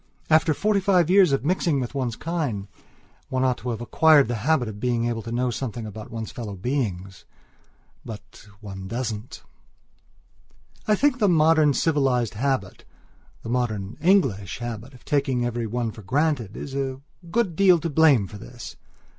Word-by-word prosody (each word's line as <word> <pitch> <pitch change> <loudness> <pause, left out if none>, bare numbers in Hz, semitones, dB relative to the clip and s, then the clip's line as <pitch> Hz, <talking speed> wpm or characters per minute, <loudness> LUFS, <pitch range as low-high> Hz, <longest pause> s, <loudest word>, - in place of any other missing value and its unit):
After 155 0 +4
forty 210 -1 +1
five 180 -3 +3
years 190 -5 +6
of 135 -1 0
mixing 170 -3 +1
with 125 0 -4
one's 125 -5 -2
kind, 145 - -3 0.6
one 130 -1 0
ought 130 -1 +1
to 125 - -5
have 115 -1 -3
acquired 150 +2 +5
the 120 - -1
habit 140 -2 +2
of 105 -1 -7
being 120 0 0
able 120 -1 -2
to 115 - -7
know 125 +1 0
something 115 -1 -4
about 105 0 -8
one's 115 -1 -6
fellow 110 -5 -6
beings. 95 -4 -3 0.8
But 110 -1 -11
one 95 -3 -8
doesn't. 115 0 -5 1.4
I 215 - +4
think 275 +3 +2
the 205 -3 +3
modern 155 -3 +4
civilized 135 -8 +1
habitthe 135 +4 -2 0.6
modern 115 -4 -2
English 135 - +2
habit 120 +2 -7
of 125 - -18
taking 135 -4 0
every 120 -1 -2
one 120 0 -2
for 110 - -12
grantedis 135 - -1
a 135 -1 -3 0.3
good 200 -3 0
deal 185 -1 +5
to 165 - -3
blame 150 -8 +4
for 105 +2 -10
this. 120 +4 -10
125 Hz, 160 wpm, -24 LUFS, 115-155 Hz, 1.4 s, years